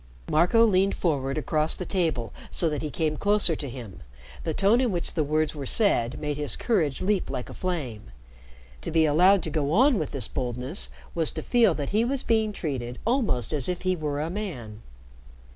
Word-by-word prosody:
Marco 180 +9 +4
leaned 195 -2 +2
forward 140 -5 -1
across 155 +1 +2
the 180 - -5
table 160 - -1 0.2
so 170 - +3
that 150 -2 -3
he 155 - -3
came 155 +1 -1
closer 205 -3 +3
to 145 -2 -6
him. 115 -6 -9 0.4
The 160 - -2
tone 210 +5 +3
in 250 -4 +1
which 175 -2 -1
the 155 - +1
words 155 +1 0
were 140 -4 -6
said 125 - +1
made 150 -1 -3
his 150 -1 -1
courage 165 - 0
leap 200 0 0
like 125 - -5
a - - -9
flame. 145 - -4 0.7
To - - -4
be 160 0 +3
allowed 180 +5 +4
to 160 - -4
go 145 -2 -1
on 255 +3 +4
with 155 - -2
this 135 -6 -3
boldness 125 - -3 0.2
was 165 -2 0
to - - -5
feel 230 -8 +3
that 145 -2 -4
he 215 +3 +3
was 260 +2 -1
being 220 -2 +1
treated 130 -10 -4
almost 225 - 0
as 145 -1 +1
if 180 0 -3
he 185 0 +1
were 150 -3 -3
a 160 +3 -2
man. 125 - -6
160 Hz, 200 wpm, -26 LUFS, 140-195 Hz, 0.7 s, Marco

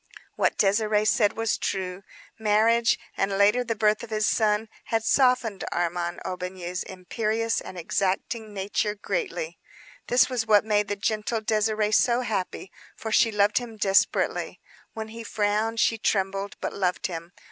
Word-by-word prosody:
What - - +1
Désirée 210 +1 +2
said 210 -1 +3
was 225 -1 -1
true. 185 -1 -3 0.4
Marriage, 225 +2 +3 0.2
and 195 0 0
later 210 +5 +4
the 230 -2 -2
birth 210 0 +2
of 235 - -8
his 215 -1 0
son 215 0 +2 0.2
had 225 -1 0
softened 250 -4 +2
Armand 175 0 -2
Aubigny's 180 -1 -4
imperious 220 +4 -2
and 185 - -9
exacting 195 +5 -2
nature 205 +1 -1
greatly. 475 - -3 0.5
This 245 - +4
was 245 -4 -2
what 210 -1 +5
made 210 -1 +1
the 205 - -2
gentle 215 +2 -1
Désirée 215 -1 +1
so 240 +3 +3
happy, 195 -5 -3 0.2
for 220 - -6
she 225 +1 +4
loved 210 +1 +3
him 235 -3 -9
desperately. 195 -1 +1 0.3
When 220 -1 -6
he 230 +1 -8
frowned 215 +1 0
she 225 0 +2
trembled, 195 -1 -1
but - - -3
loved 180 -2 -1
him. 170 -1 -5
210 Hz, 150 wpm, -26 LUFS, 195-225 Hz, 0.5 s, what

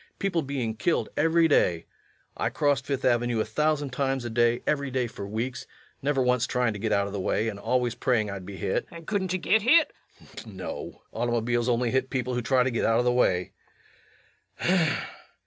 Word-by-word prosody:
People 185 -4 0
being 135 -6 -3
killed 170 +9 0
every 165 +2 +3
day. 85 - +2 0.5
I - - -1
crossed 140 -2 0
Fifth 140 -2 -2
Avenue 120 -2 +2
a - - +1
thousand 145 +4 0
times 135 -1 -1
a 120 - -4
day, 120 +1 +2
every 140 -2 0
day 130 -1 0
for 100 -3 -7
weeks, 120 +5 -4 0.3
never 140 -1 +1
once 125 -1 +2
trying 125 -3 0
to 100 - -7
get 110 +1 -2
out 100 -1 +2
of 100 - -6
the 100 - -3
way, 105 +3 0
and 100 -2 -7
always 120 +2 0
praying 120 -4 +1
I'd 100 -2 -6
be 95 +1 -8
hit. - - -1
LUKE. 170 - -10
And 165 - -12
couldn't 190 -2 -1
yu - - +1
git 220 +4 +2
hit? 305 +9 +4 0.3
REVENUE. - - -25
[In - - -17
disgust.] - - -10
No. 95 -3 -7
Automobiles 120 +1 0
only 120 0 +1
hit 130 0 0
people 125 -1 -2
who 125 - -1
try 125 +2 +3
to 130 - 0
get 115 - -1
out 115 - +3
of 120 - +1
the 125 - +4
way. 90 -7 +1
125 Hz, 215 wpm, -27 LUFS, 115-140 Hz, 0.5 s, hit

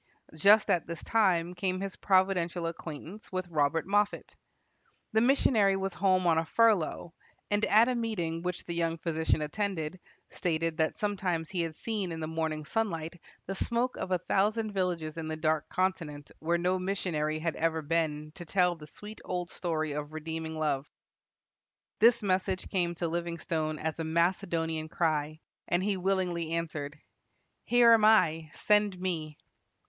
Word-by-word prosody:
Just 205 +7 +5
at 170 - +1
this 170 0 -6
time 180 -6 +2
came 185 0 -1
his 195 0 -4
providential 185 -3 +1
acquaintance 165 +4 -7
with 185 -1 -3
Robert 155 0 +1
Moffat. 205 +1 0 0.8
The 220 - +4
missionary 230 -6 +4
was 195 -1 -2
home 185 -1 +2
on 165 -2 +4
a 165 - -2
furlough, 205 -7 +2 0.4
and 205 +1 +2
at 220 +3 +6
a 255 - +1
meeting 190 -9 -2
which 180 0 -4
the 170 - -4
young 165 -1 0
physician 160 -1 0
attended, 180 0 -3 0.3
stated 165 -1 -1
that 160 -2 0
sometimes 185 -6 -1
he 180 -3 -1
had 165 -2 -3
seen 205 -4 -3
in 165 - -5
the 160 - -3
morning 160 -1 -2
sunlight 170 -4 -2 0.2
the 195 - -3
smoke 235 +5 -1
of - - -4
a 185 - +2
thousand 210 +5 0
villages 175 -5 -2
in 160 -1 -4
the 155 - -3
Dark 155 0 0
Continent 165 -6 -2
where 170 +2 +1
no 180 +2 +1
missionary 175 -5 -1
had 160 +1 -2
ever 160 -1 0
been 155 -1 -1
to 175 - -9
tell 180 +1 +2
the 150 -2 -12
sweet 210 +7 -11
old 180 -1 -3
story 155 -3 -2
of 145 +1 -5
redeeming 160 0 -5
love. 150 -2 -1 1.1
This 230 +1 +5
message 185 -1 0
came 175 -2 0
to 170 0 -2
Livingstone 165 -2 -2
as 160 +1 -3
a - - -1
Macedonian 165 -1 0
cry, 155 -2 -1 0.3
and 175 +2 +1
he 205 0 +1
willingly 180 -3 -1
answered, 155 -3 -3 0.7
"Here 240 -1 +6
am 225 -2 +6
I; 165 -8 +4
send 210 -3 +2
me." 160 -5 -3
170 Hz, 160 wpm, -30 LUFS, 160-195 Hz, 1.1 s, at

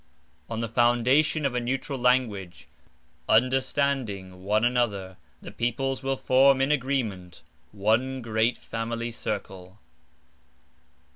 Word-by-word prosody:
(On 115 0 -3
the 115 - -2
foundation 125 +6 +2
of 135 - 0
a 125 - 0
neutral 135 +3 -3
language, 110 -9 0 0.6
Understanding 125 -6 0
one 105 +3 +2
another, 105 -7 0 0.3
The - - -8
peoples 130 +3 -2
will 135 0 -1
form 135 +1 +4
in 135 +2 +2
agreement 120 -11 -2 0.3
One 110 +6 0
great 115 +1 +1
family 115 +1 -4
circle). 95 -4 -5
120 Hz, 110 wpm, -26 LUFS, 105-130 Hz, 0.6 s, form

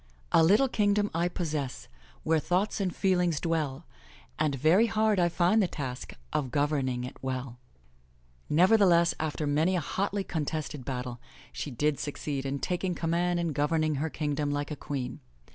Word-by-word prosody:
A - - +6
little 210 +11 +5
kingdom 205 -3 +1
I 170 +2 +1
possess^ 155 -7 -3 0.4
Where 160 0 +2
thoughts 185 +7 0
and 185 -2 0
feelings 180 -5 +2
dwell. 155 -3 -2 0.5
And 155 -2 +1
very 165 - +4
hard 215 -2 +2
I 175 -1 +3
find 180 +6 +3
the 190 - +2
task 130 -6 -6 0.2
Of 135 -4 0
governing 140 -3 0
it 125 - -7
well 130 -2 -4 0.9
Nevertheless, 175 0 +5
after 155 -1 -2
many 155 +6 +2
a - - +2
hotly 195 +5 -2
contested 150 -5 -4
battle, 125 -2 -4 0.3
she - - -4
did 145 +3 0
succeed 140 -1 -3
in 140 +1 -2
taking 180 +4 -2
command 175 +1 0
and 170 -3 -1
governing 155 +1 +1
her 160 - -1
kingdom 145 -1 -2
like 145 +1 -2
a - - -2
queen. 135 - -5
155 Hz, 160 wpm, -29 LUFS, 145-180 Hz, 0.9 s, A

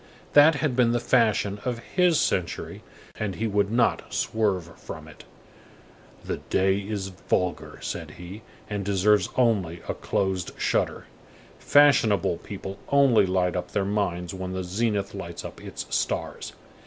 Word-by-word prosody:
That 145 +2 +7
had 145 -4 -1
been 120 -2 +3
the 120 - +2
fashion 110 -4 +2
of 125 -1 -2
his 175 +6 +2
century, 90 -2 -1 0.4
and 100 -3 -2
he 115 - -2
would 100 -2 +1
not 115 0 +1
swerve 95 -7 -1
from - - -9
it. - - -14 1.0
"The - - -2
day 95 +1 +1
is 100 -1 -4
vulgar," 90 -1 -2
said - - -4
he, 90 +5 -9 0.3
"and 105 -2 -3
deserves 100 +1 +3
only 100 -9 +1
a - - -1
closed 95 -2 -2
shutter. - - 0 0.5
Fashionable 110 -11 +4
people 95 +1 -8
only 135 -8 +5
light 90 -1 +1
up 90 0 -4
their 100 -2 +1
minds 95 -4 -1
when 95 0 -5
the 95 0 -3
zenith 100 +2 -1
lights 85 -4 -7
up - - -9
its - - -6
stars." - - -2
100 Hz, 145 wpm, -26 LUFS, 95-115 Hz, 1.0 s, That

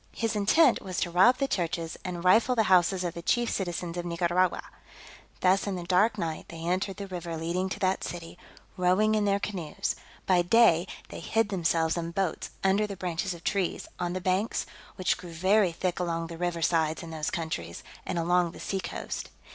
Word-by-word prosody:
His 225 -1 -1
intent 230 +7 +4
was 185 -3 -4
to 175 - -1
rob 190 +9 +5
the 275 - 0
churches, 170 -5 -2
and 175 -2 -5
rifle 225 +7 +5
the 225 - +3
houses 180 +1 +4
of 175 -2 -2
the 170 - -7
chief 240 +6 +1
citizens 175 -2 -3
of 175 - -3
Nicaragua. 175 +1 +1 0.8
Thus 190 +2 +3
in 200 - -1
the 175 - -5
dark 200 +5 +3
night 165 -4 -3
they 165 -1 -7
entered 185 +3 -1
the 200 - -5
river 175 -3 -5
leading 175 +4 -1
to 205 - -5
that 190 0 +1
city, 175 0 -7 0.4
rowing 185 +4 +3
in 210 -1 +2
their 200 0 +2
canoes; 180 -7 -3 0.3
by 180 -2 +4
day 175 -2 +4 0.2
they - - -7
hid 225 -2 0
themselves 165 -3 +1
and 170 0 -4
boats 190 -4 -1
under 195 +2 +3
the 200 -2 -7
branches 180 +1 -2
of 170 - -14
trees, 195 -4 -1
on 175 0 -1
the 185 - -3
banks, 185 +5 0 0.3
which 185 -1 +1
grow 180 - -10
very 185 +3 +3
thick 180 +1 -2
along 165 -2 -1
the 165 0 -8
river 175 -2 -1
sides 160 0 +1
in 165 - -8
those 155 -1 -2
countries, 85 - -4 0.2
and - - -3
along 175 0 +2
the - - -11
sea 195 - -2
coast. - - -5
180 Hz, 200 wpm, -28 LUFS, 170-195 Hz, 0.8 s, rob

